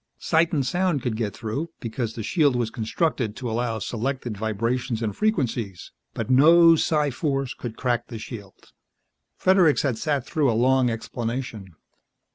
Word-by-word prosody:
Sight 165 +1 +2
and 145 -6 0
sound 180 -3 0
could 120 -4 -1
get 110 -2 -2
through, 135 +9 -3
because 115 -1 -4
the 115 - -5
shield 145 - +2
was 120 -2 -1
constructed 115 0 -1
to 125 - -5
allow 115 0 -1
selected 120 +2 -3
vibrations 115 +3 -2
and 105 -3 -2
frequencies. 120 - -1 0.2
But - - -3
no 165 +6 +7
psi 150 -2 +1
force 135 -1 -2
could 115 -2 -7
crack 120 -2 -1
the 115 - -7
shield. 110 -3 -10 0.7
Fredericks 185 -5 +4
has 125 -6 -1
sat 145 -5 0
through 150 -4 +1
a 110 - 0
long 130 +1 +3
explanation. 115 -4 -5
125 Hz, 155 wpm, -24 LUFS, 115-145 Hz, 0.7 s, no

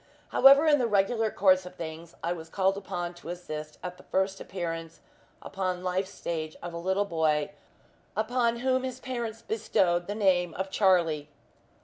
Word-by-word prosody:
However, 275 +3 +7
in 295 -2 +5
the 245 - +2
regular 220 +2 +2
course 185 -3 +4
of 180 0 -10
things, 165 0 -8
I 170 +1 0
was 165 -2 -9
called 190 +1 +1
upon 180 -3 -4
to 175 -1 -11
assist 155 -3 -6
at 180 0 -5
the - - -15
first 190 0 0
appearance 165 -3 -5 0.4
upon 185 -2 -3
life's 185 +1 -1
stage 155 -4 -4
of 175 -1 -5
a 170 - -4
little 190 +3 +1
boy, 155 -5 +1 0.7
upon 235 +1 +1
whom 260 0 +2
his 255 -1 -5
parents 235 -4 -4
bestowed 175 -5 +1
the 205 - -3
name 180 -5 +2
of 190 +1 -3
Charlie. 170 -8 +2
185 Hz, 165 wpm, -28 LUFS, 170-215 Hz, 0.7 s, However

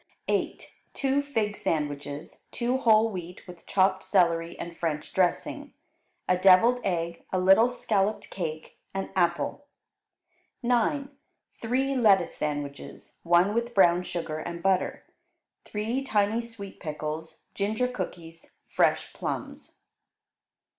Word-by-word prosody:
8. - - -1 0.3
Two 275 0 +1
fig 225 -8 -1
sandwiches, 145 -1 -4
two 245 +2 0
whole 225 -2 +4
wheat 180 -2 -8
with 175 -2 -13
chopped 190 -1 +2
celery 170 -3 +1
and 170 0 -7
French 155 -3 -3
dressing; 180 -2 -1 0.5
a 180 - +4
devilled 195 +7 +6
egg; 170 -2 -2
a 185 - +1
little 195 +6 +6
scalloped 215 -4 -1
cake; 160 -4 -5 0.2
an 195 - -3
apple. 175 +10 0 1.0
9. 250 +4 +1 0.5
Three 265 +4 0
lettuce 200 -8 +4
sandwiches, 145 -1 -5
one 175 +4 +3
with 235 +1 -2
brown 175 -2 +5
sugar 170 -3 -4
and 170 +2 -6
butter; 190 -1 +1 0.6
three 220 +5 -2
tiny 220 -3 +1
sweet 225 -4 -9
pickles; 155 0 -6
ginger 215 +5 0
cookies; 165 -9 -7
fresh - - +1
plums. - - -6
190 Hz, 115 wpm, -27 LUFS, 170-225 Hz, 1.0 s, devilled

